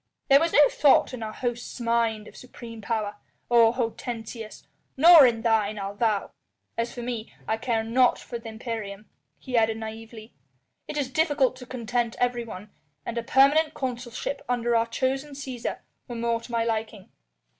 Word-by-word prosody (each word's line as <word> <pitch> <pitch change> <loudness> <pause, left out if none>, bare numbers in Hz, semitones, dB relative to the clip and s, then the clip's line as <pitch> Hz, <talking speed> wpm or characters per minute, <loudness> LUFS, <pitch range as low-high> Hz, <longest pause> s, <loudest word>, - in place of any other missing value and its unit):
There 275 0 +8
was 330 +2 +1
no 295 -1 +7
thought 280 -2 +3
in 250 - -6
our 220 -1 -4
host's 240 +2 -4
mind 230 -2 0
of - - -14
supreme 235 -3 -10
power, 210 -2 -2 0.3
O 230 -1 +6
Hortensius! 230 -2 -5 0.3
nor 320 -1 +9
in 230 -2 -1
thine, 215 -2 +1
I'll 195 0 -4
vow. 210 -1 0 0.4
As 230 +1 -2
for 240 - -7
me, 235 -2 -5
I 220 - 0
care 225 -1 -1
nought 245 +2 +3
for 235 - -7
the 230 0 -9
imperium," 220 -3 -6 0.3
he 255 -2 -6
added 225 -1 +3
naïvely, 225 0 -9 0.6
"it 300 - -5
is 270 -3 -2
difficult 290 -4 +2
to 250 -1 -11
content 240 -2 -2
everyone, 235 -5 -2 0.3
and 235 - -4
a 235 - -1
permanent 280 +6 +4
consulship 250 0 -4
under 240 -1 +1
our 230 0 +2
chosen 270 +4 -2
Cæsar 260 -4 -5 0.3
were 240 - -6
more 230 0 -1
to 240 - -11
my 230 -1 +1
liking. 220 -3 -3
235 Hz, 165 wpm, -26 LUFS, 225-255 Hz, 0.6 s, nor